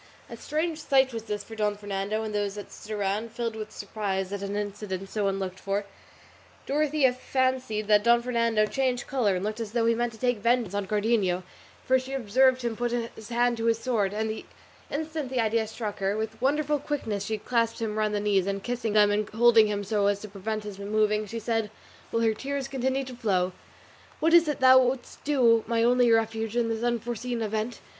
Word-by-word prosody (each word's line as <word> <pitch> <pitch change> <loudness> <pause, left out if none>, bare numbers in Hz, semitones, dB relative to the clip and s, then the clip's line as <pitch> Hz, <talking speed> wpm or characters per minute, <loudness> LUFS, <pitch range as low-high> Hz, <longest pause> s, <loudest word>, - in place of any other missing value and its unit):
A - - -5
strange 315 +2 -2
sight 265 -4 +3
was 225 -1 -5
this 210 -2 -3
for 225 - -10
Don 210 -1 0
Fernando 205 +1 -3
and 215 -1 -4
those 205 -1 -1
that 205 - -8
stood 215 - -11
around, 205 +2 -1
filled 230 -1 -3
with 215 -1 -6
surprise 195 -2 -3
at 200 - -4
an 200 0 -3
incident 205 -2 -4
so 210 -2 0
unlooked 190 -1 -3
for. 200 +1 -2 0.8
Dorothea 290 -2 +2
fancied 255 -4 -1
that 210 0 +4
Don 235 +1 +4
Fernando 230 -3 +2
changed 255 +1 -1
colour 235 -8 +1
and 180 +2 -2
looked 215 +2 -3
as 225 -2 -5
though 235 -2 +2
he 230 - +4
meant 240 +1 -1
to - - -12
take 245 -3 +1
vengeance 235 -2 +1
on 200 -1 -2
Cardenio, 205 -3 +1 0.4
for 260 0 +4
she 260 +1 -7
observed 255 +1 +3
him 235 -2 -1
put 240 +2 -1 0.2
his 220 +1 -11
hand 240 0 +2
to 225 - -2
his 230 -1 +3
sword; 225 -5 0
and 220 +1 -1
the 220 0 -4 0.5
instant 310 -2 -3
the 255 -1 -1
idea 220 0 +1
struck 215 -2 -5
her, 195 +1 0
with 220 +1 -4
wonderful 295 +2 +1
quickness 225 -9 -3
she 220 +1 -2
clasped 230 +1 0
him 220 -2 -2
round 215 -1 +1
the - - +1
knees, 200 -2 +1
and 195 0 -2
kissing 240 -3 -2
them 210 -1 +5
and 210 0 0
holding 225 -1 +5
him 205 -1 -2
so 200 0 +1
as 200 0 +1
to 215 - -7
prevent 210 +2 -4
his 205 -2 -8
moving, 210 +1 +1
she 230 - -5
said, 225 -1 -1 0.4
while 230 - 0
her 225 -1 +3
tears 275 +4 -4
continued 265 0 -1
to 255 -1 -8
flow, 190 -6 0 0.7
"What 325 +1 +2
is 340 -1 +7
it 295 -3 -2
thou 260 0 +8
wouldst 255 0 -2
do, 240 -6 +4
my 230 0 +1
only 245 0 +4
refuge, 225 0 +1
in 235 -1 +1
this 225 0 -2
unforeseen 240 0 -2
event? 220 +2 -3
225 Hz, 210 wpm, -27 LUFS, 210-245 Hz, 0.8 s, thou